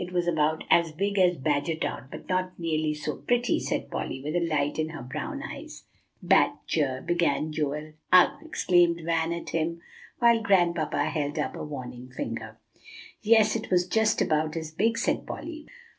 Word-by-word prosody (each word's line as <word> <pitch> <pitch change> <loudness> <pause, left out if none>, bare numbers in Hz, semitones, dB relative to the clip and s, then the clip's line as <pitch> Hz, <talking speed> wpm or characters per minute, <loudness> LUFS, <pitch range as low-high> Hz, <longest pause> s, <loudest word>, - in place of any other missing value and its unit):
It 180 - -8
was 175 -1 +1
about 160 -1 +1
as 170 -1 +4
big 200 +5 -1
as 180 -2 +4
Badgertown, 145 -2 -1
but - - -10
not 185 0 -1
nearly 155 -2 -1
so 150 0 -4
pretty," 245 -1 +1
said - - -3
Polly, 130 - -3
with 150 +4 -4
a - - +3
light 150 -2 0
in 155 0 0
her 160 -5 -7
brown 155 - -5
eyes. 310 +2 -8 0.4
"Bad - - +4
ger" 135 -5 -1
began 170 -3 +1
Joel. 150 0 -3 0.2
"Ugh!" 180 -1 +7
exclaimed 175 - +2
Van 165 0 +1
at 170 0 -5
him, 165 +1 -1 0.4
while 235 -2 +4
Grandpapa 175 -6 +2
held 150 0 -2
up 150 - -2
a - - -5
warning 125 -4 -7
finger. 130 - -5 0.6
"Yes, 220 0 +4
it 225 - -4
was 180 -1 +2
just 220 +3 +2
about 155 +1 0
as 160 -1 -5
big," 225 +8 +1
said - - -1
Polly. 315 -2 -7
165 Hz, 175 wpm, -27 LUFS, 150-185 Hz, 0.6 s, Ugh